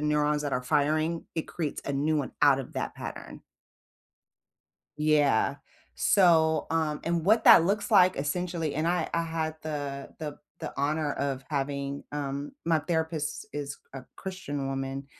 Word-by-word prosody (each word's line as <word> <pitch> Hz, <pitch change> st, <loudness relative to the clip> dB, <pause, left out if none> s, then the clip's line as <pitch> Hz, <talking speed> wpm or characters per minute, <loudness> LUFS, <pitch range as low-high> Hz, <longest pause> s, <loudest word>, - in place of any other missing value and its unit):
neurons 150 Hz, 0 st, +1 dB
that 145 Hz, -, -3 dB
are 125 Hz, -, 0 dB
firing 155 Hz, +5 st, +1 dB
it 160 Hz, -, -1 dB
creates 155 Hz, -4 st, -4 dB
a 140 Hz, -, -2 dB
new 150 Hz, +3 st, +1 dB
one 140 Hz, -3 st, -2 dB
out 140 Hz, -2 st, +6 dB
of 135 Hz, -, -7 dB
that -, -, -3 dB
pattern. -, -, -8 dB, 1.6 s
Yeah. 145 Hz, -3 st, +3 dB, 0.4 s
So, 160 Hz, -5 st, +4 dB
um, 155 Hz, -2 st, 0 dB
and 170 Hz, -1 st, 0 dB
what 220 Hz, +4 st, +4 dB
that 165 Hz, -, +9 dB
looks 205 Hz, +5 st, 0 dB
like 185 Hz, -3 st, +6 dB
essentially 165 Hz, +2 st, -2 dB
and 155 Hz, +2 st, 0 dB
I 175 Hz, +1 st, +1 dB
I 170 Hz, -, +2 dB
had 160 Hz, -1 st, -3 dB
the 145 Hz, -3 st, -4 dB
the 150 Hz, -2 st, -6 dB, 0.2 s
the -, -, -5 dB
honor 145 Hz, +1 st, 0 dB
of 135 Hz, -1 st, -3 dB
having, 140 Hz, -1 st, -2 dB
um 145 Hz, 0 st, -4 dB
my 165 Hz, -2 st, +2 dB
therapist 160 Hz, -2 st, -2 dB
is 145 Hz, -1 st, -5 dB, 0.2 s
a 135 Hz, -, -6 dB
Christian 145 Hz, -8 st, -5 dB
woman, 135 Hz, 0 st, -4 dB
150 Hz, 155 wpm, -28 LUFS, 140-165 Hz, 1.6 s, that